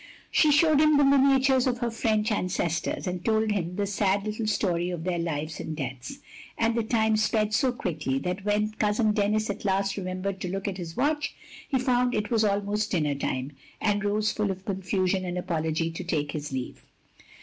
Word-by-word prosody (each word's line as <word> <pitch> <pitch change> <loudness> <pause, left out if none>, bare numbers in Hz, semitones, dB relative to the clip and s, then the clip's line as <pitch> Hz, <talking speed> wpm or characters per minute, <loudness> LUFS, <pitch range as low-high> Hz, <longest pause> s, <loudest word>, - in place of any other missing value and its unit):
" - - -26
She 305 - +4
showed 300 0 +5
him 305 -1 +5
the 290 - +5
miniatures 270 -1 +4
of 245 -1 0
her 240 -1 -2
French 220 -1 0
ancestors, 175 -4 -1
and 180 -1 -3
told 220 -1 +2
him 180 -3 -2
the 205 +1 0
sad 200 0 0
little 215 +1 -3
story 175 -4 0
of 175 -3 -4
their 175 -1 -1
lives 155 -2 -3
and 155 - -5
deaths; 130 -3 -5 0.4
and 230 0 +2
the 230 - +1
time 220 -1 +2
sped 215 0 +1
so 260 +3 +3
quickly 155 - -2
that 180 +6 -3
when 210 +1 +1
cousin 215 +1 +1
Denis 210 0 +1
at - - -8
last 195 0 +1
remem 185 -1 -4
bered 195 -1 -2
to - - -4
look 195 +2 -3
at 195 -2 -3
his 165 -2 -7
watch, 295 0 0 0.3
he 270 - +2
found 250 -1 +1
it 210 0 -2
was 225 -2 +3
almost 205 +1 0
dinner 150 -5 +1
time, 135 -1 -3 0.3
and 205 -1 +1
rose 210 +1 +1
full 210 -2 -1
of 190 0 -5
confusion 190 -1 0
and 180 -1 -3
apology 165 -2 -1
to 165 +3 -6
take 150 -5 -1
his 150 -1 -5
leave. 130 -2 -5
205 Hz, 205 wpm, -27 LUFS, 175-220 Hz, 0.4 s, showed